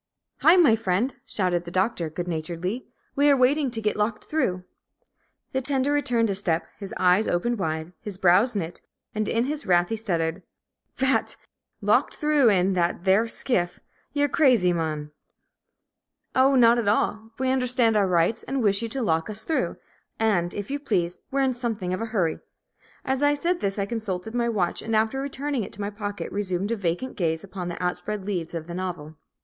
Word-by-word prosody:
"Hi, 330 - +6
my 320 -11 +6
friend!" 225 +4 -1
shouted 180 -5 0
the 170 - -8
Doctor, 185 -2 0
good 175 +3 -5
naturedly. 175 +7 -3 0.3
"We 285 +1 +4
are 280 - +5
waiting 270 +2 +3
to 230 -2 -2
get 210 - +1
locked 210 +1 -1
through." 185 -13 -1 0.9
The 265 - -1
tender 270 +1 0
returned 240 -7 +1
a - - 0
step, 175 -4 0
his 195 -2 -6
eyes 185 +3 +3
opened 235 +6 0
wide, 160 0 -3
his 205 -3 -7
brows 190 +7 +4
knit, 175 -3 -4 0.3
and 215 -2 -1
in 230 +2 +1
his 290 -1 -4
wrath 175 -1 +3
he 225 - -1
stuttered, 175 -5 -2 0.6
"Ph 265 0 +2
h - - +4
a - - +2
t! - - -6 0.5
Locked - - +2
through 300 -5 +3
in 190 -1 +3
that 175 -1 0
theer 195 +4 +4
s 225 - -4
s - - -6
k 250 -7 +3
i - - +2
ff? - - -21 0.3
Ye're 290 0 +2
cr 300 +3 +1
razy, 205 -9 +5
mon!" 155 -3 -3 1.2
"Oh, 270 +1 +4
not 240 -1 +6
at 225 - -2
all. 220 +1 +1
We 260 0 +1
understand 250 -3 +2
our 205 -2 +3
rights, 180 +5 +2
and 270 -2 -2
wish 200 0 +3
you 230 - -3
to 265 +2 -3
lock 165 -3 0
us 215 +1 -4
through. 320 - -1 0.4
And, 190 -6 +1
if 205 +4 -5
you 285 - -1
please, 180 -10 -1
we're 275 0 0
in 265 -1 +2
something 225 -7 -2
of 185 - -3
a - - -1
hurry." 190 -8 0 0.7
As 265 +1 0
I 290 0 +4
said 345 +4 0
this 195 0 -2
I 200 - 0
consulted 215 -2 -4
my 240 -1 +1
watch, 185 -6 -1
and 225 0 -2
after 220 +5 +1
returning 280 -2 -2
it - - -8
to 205 - -6
my 200 +1 -2
pocket 205 -1 -5
resumed 195 0 -1
a - - +1
vacant 200 +6 -2
gaze 160 -3 -1
upon 190 -2 -6
the 175 - -5
outspread 180 +3 -3
leaves 175 -5 -3
of 160 -1 -4
the 170 - -7
novel. 175 -4 -5
210 Hz, 210 wpm, -25 LUFS, 180-250 Hz, 1.2 s, Hi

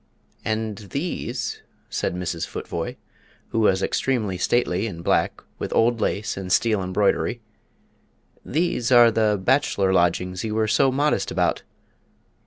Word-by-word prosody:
"And 110 -1 -2
these," 125 - -4 0.3
said - - -2
Mrs. 90 -2 -3
Futvoye, - - -5 0.5
who 115 - -1
was 95 -3 +3
extremely 110 -8 0
stately 95 +1 +1
in 85 -5 -7
black, - - +1 0.2
with - - -4
old 115 0 +3
lace 105 +1 -1
and 95 -1 -5
steel 105 +1 +3
embroidery 95 +2 0 1.0
"these 150 -6 -1
are 120 -2 +7
the 105 -2 +2
bachelor 100 -4 +2
lodgings 90 +1 +1
you 110 -1 -3
were 110 0 +1
so 135 +5 +3
modest 145 +3 +1
about! - - 0
110 Hz, 130 wpm, -23 LUFS, 95-120 Hz, 1.0 s, are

